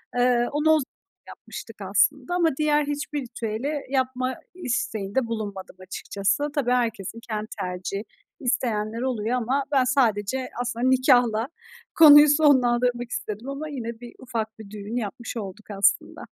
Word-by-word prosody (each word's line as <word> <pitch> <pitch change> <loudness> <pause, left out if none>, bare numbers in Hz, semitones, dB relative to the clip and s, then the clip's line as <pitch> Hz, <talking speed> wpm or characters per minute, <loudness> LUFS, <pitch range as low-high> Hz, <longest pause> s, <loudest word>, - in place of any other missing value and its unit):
Eee, 245 -1 +3
onu 300 +2 +1
o 315 0 +6
zaman 275 - -5 0.4
yapmıştık 225 - -10
aslında 255 - +1
ama 340 -2 +3
diğer 300 -1 +2
hiçbir 290 0 -3
ritüeli 235 +2 -4 0.2
yapma 260 -1 -1 0.2
isteğinde 245 - -2
bulunmadım 205 -5 -5
açıkçası. 200 +8 -2
Tabii 255 -4 +1
herkesin 230 -4 -1
kendi 215 -1 -3
tercihi. 185 +2 -4 0.4
İsteyenler 230 -4 -1
oluyor 245 -2 -1
ama 255 +4 0
ben 270 -3 +4
sadece, 250 -1 +1
aslında, 245 +1 -1
nikâhla 245 -3 +3 0.5
konuyu 295 -2 +9
sonlandırmak 245 -5 +3
istedim 215 +6 -5
ama 295 +3 -5
yine 235 -5 -5
bir 240 -1 -10
ufak 225 -4 -4
bir 215 -2 -10
düğün 210 +2 -7
yapmış 235 +1 -4
olduk 205 +1 -7
aslında. 200 0 +1
245 Hz, 135 wpm, -25 LUFS, 215-265 Hz, 0.5 s, konuyu